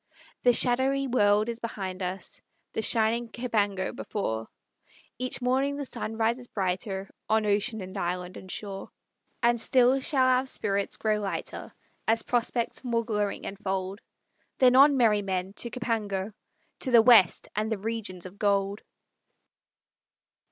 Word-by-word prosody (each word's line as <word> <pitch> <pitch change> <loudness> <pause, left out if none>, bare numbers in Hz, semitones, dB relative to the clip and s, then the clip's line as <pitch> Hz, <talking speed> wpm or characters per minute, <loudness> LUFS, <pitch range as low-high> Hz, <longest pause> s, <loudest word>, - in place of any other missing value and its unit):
The 245 - +5
shadowy 260 +3 +2
world 210 -3 +3
is 235 -1 -3
behind 195 -5 -5
us, 185 +1 -4 0.3
The - - -1
shining 225 +2 +1
Cèpango, 205 -6 -1
before; 110 - -3 0.7
Each 255 0 -1
morning 265 +3 +1
the 285 0 -4
sun 225 -3 -5
rises 235 +2 0
brighter 190 0 -2 0.2
On 220 0 +3
ocean, 210 +1 +1
and 185 +1 -8
island, 180 -1 -3
and 185 - -10
shore. 195 -2 -6 0.5
And 235 -1 +3
still 255 +2 +4
shall 265 -2 +2
our 255 +1 +3
spirits 200 -5 -1
grow 215 -1 +1
lighter, 200 -2 -5 0.4
As 225 0 +2
prospects 240 +1 -1
more 230 -2 0
glowing 210 -3 -2
enfold; 195 0 -4 0.6
Then 255 -1 +5
on, 280 +1 +7
merry 215 -4 +4
men! 190 -1 -3
to 240 - -2
Cèpango, 215 -5 -2 0.5
To 265 - -2
the 235 -3 +7
west, 225 -7 +6
and 215 +2 -1
the 220 - 0
regions 200 -4 -5
of 185 +2 -11
gold!" 200 -1 +1
220 Hz, 140 wpm, -27 LUFS, 195-245 Hz, 0.7 s, on